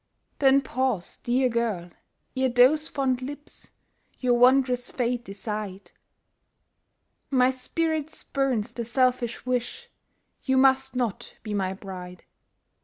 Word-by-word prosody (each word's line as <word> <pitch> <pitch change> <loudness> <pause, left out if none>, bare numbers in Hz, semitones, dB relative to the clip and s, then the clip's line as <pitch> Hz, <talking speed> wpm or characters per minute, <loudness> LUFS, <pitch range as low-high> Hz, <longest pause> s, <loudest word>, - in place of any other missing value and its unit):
Then 275 0 +5
pause, 260 -8 -2
dear 255 +2 +1
girl! 225 -8 -2 0.4
ere 260 0 +2
those 260 +6 +4
fond 260 -4 -1
lips 290 +3 -9 0.5
Your 250 -1 +2
wanderer's 250 0 +4
fate 245 -1 -1
decide; 200 -1 -6 1.4
My 255 -1 +4
spirit 315 +4 -2
spurns 260 -7 -1
the 235 - -4
selfish 250 0 0
wish 250 -1 -3 0.5
You 265 -1 +1
must 265 0 +3
not 240 -6 -3
be 215 - -4
my 190 -2 -1
bride. 180 -2 -9
250 Hz, 110 wpm, -26 LUFS, 220-265 Hz, 1.4 s, Then